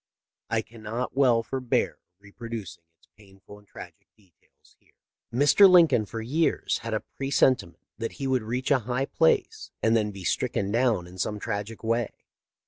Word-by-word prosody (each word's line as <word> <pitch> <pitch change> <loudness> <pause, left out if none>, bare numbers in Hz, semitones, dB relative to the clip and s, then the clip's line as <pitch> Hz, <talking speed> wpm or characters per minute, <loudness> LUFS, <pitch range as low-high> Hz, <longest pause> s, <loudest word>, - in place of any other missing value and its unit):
I 115 -1 0
cannot 115 +2 -6
well 125 -4 +3
forbear 130 0 -1 0.2
reproducing 105 -3 -8
its - - -30
painful 100 0 -16
and 105 - -24
tragic - - -12
details 95 -6 -29
here.* - - -33 0.2
" - - -63
Mr. 145 - +6
Lincoln 160 - +5
for 115 +2 -6
years 150 +8 0
had 115 -1 -4
a 110 - -3
presentiment 130 -8 +1
that 115 - -4
he 135 - -6
would 130 -2 +1
reach 125 +6 -3
a 140 - +5
high 125 +3 -2
place 165 - +1
and 115 +1 +3
then 105 -2 +1
be 100 -2 -9
stricken 100 +2 -1
down 115 -6 +1
in 90 +1 -13
some 105 +3 -2
tragic 105 +3 -5
way. 115 0 0
115 Hz, 165 wpm, -26 LUFS, 105-130 Hz, 0.2 s, Mr